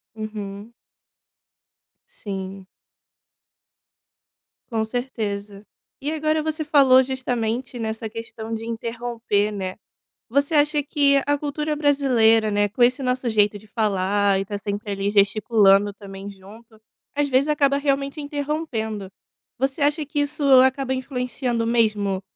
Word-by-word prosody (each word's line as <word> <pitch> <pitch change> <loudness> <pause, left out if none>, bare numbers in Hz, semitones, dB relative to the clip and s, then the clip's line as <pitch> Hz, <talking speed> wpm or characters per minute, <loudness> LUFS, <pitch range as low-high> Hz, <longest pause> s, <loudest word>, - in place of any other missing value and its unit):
Uhum. 215 0 -7 1.4
Sim. 195 -1 -7 2.1
Com 220 -1 0
certeza 210 -4 -4 0.4
e 290 +3 -2
agora 310 0 0
você 315 0 -2
falou 275 -4 +6
justamente 250 -1 -3
nessa 220 0 -3
questão 225 0 -7
de 225 0 -4
interromper, 230 -2 -2
né, 190 -2 -4 0.5
você 280 +5 +1
acha 295 0 +3
que 280 -1 +3
a 290 0 +2
cultura 300 +1 -2
brasileira, 250 -7 +3
né, 205 0 +2
com 220 +5 +1
esse 250 +3 +3
nosso 250 -1 -1
jeito 210 -1 +2
de 205 - -17
falar 205 -2 +1
e - - 0
está 205 +1 -4
sempre 205 +1 -4
ali 200 0 -1
gesticulando 205 0 +4
também 195 0 -9
junto, 215 +3 -15 0.3
às 290 0 +1
vezes 265 +2 +3
acaba 280 -2 +2
realmente 280 +1 -1
interrompendo. 285 -9 -3 0.5
Você 270 +3 -1
acha 295 +1 +1
que 295 +1 -3
isso 290 +1 -2 0.2
acaba 260 0 +1
influenciando 250 -2 -2
mesmo 215 -5 +1
230 Hz, 125 wpm, -23 LUFS, 205-280 Hz, 2.1 s, falou